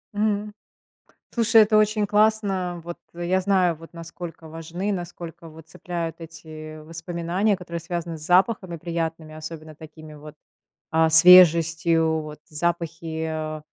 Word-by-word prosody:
М. 210 0 -1 0.8
Слушай, 230 -1 +5
это 215 0 +2
очень 215 0 +2
классно. 205 -4 +1
Вот 175 0 -7 0.2
я 175 +2 -1
знаю, 185 -3 +2
вот, 165 +1 -14
насколько 165 -1 -9
важны, 165 +5 -4
насколько 175 -2 -7
вот 160 0 -14
цепляют 170 -2 -5
эти 155 -1 -10
воспоминания, 170 +5 -2
которые 170 -2 -7
связаны 170 -1 -5
с 155 - -9
запахами 185 0 +2
приятными, 165 -1 -4
особенно 155 0 -9
такими 155 0 -13
вот, 150 0 -12 0.6
а, 160 0 +3
свежестью 165 -1 +6
вот. 150 -1 -10
Запахи, 165 0 -3
а, 155 -1 -4
170 Hz, 125 wpm, -23 LUFS, 160-180 Hz, 0.8 s, свежестью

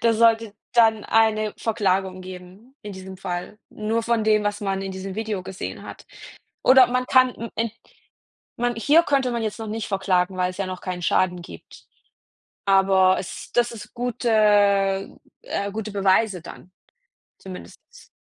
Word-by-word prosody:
Das 230 -1 +3
sollte 225 -2 +3 0.2
dann 225 -2 +4
eine 215 -1 +2
Verklagung 190 -4 -1
geben 185 +7 -12
in 205 -1 -7
diesem 190 0 -9
Fall. 180 +2 -5
Nur 220 +2 -2
von 235 -1 0
dem, 215 -1 +2
was 205 +1 -2
man 195 -1 -2
in 195 -1 -5
diesem 190 0 -6
Video 215 -3 -3
gesehen 190 0 -7
hat. - - -11 0.6
Oder 260 0 +7
man 250 0 -1
kann 255 -1 +5
im 230 - -7
End 230 -1 -1 0.8
man 240 0 0
hier 300 +8 +4
könnte 275 -5 +1
man 235 -1 -2
jetzt 215 +1 -3
noch 225 - -6
nicht 220 0 -4
verklagen, 190 -2 0
weil's 180 +1 -2
ja 195 - -1
noch 185 -1 -6
keinen 180 -1 -5
Schaden 180 0 +1
gibt. 85 - -13 0.8
Aber 190 -1 +4
es 185 - -8
das 240 0 +2
ist 230 - -10
gute, 245 0 -2 1.1
äh, 200 - -3
gute 215 0 -5
Beweise 195 -1 +2
dann, 185 +1 -12 0.7
zumindest. 195 - -12
210 Hz, 160 wpm, -23 LUFS, 190-230 Hz, 1.1 s, Oder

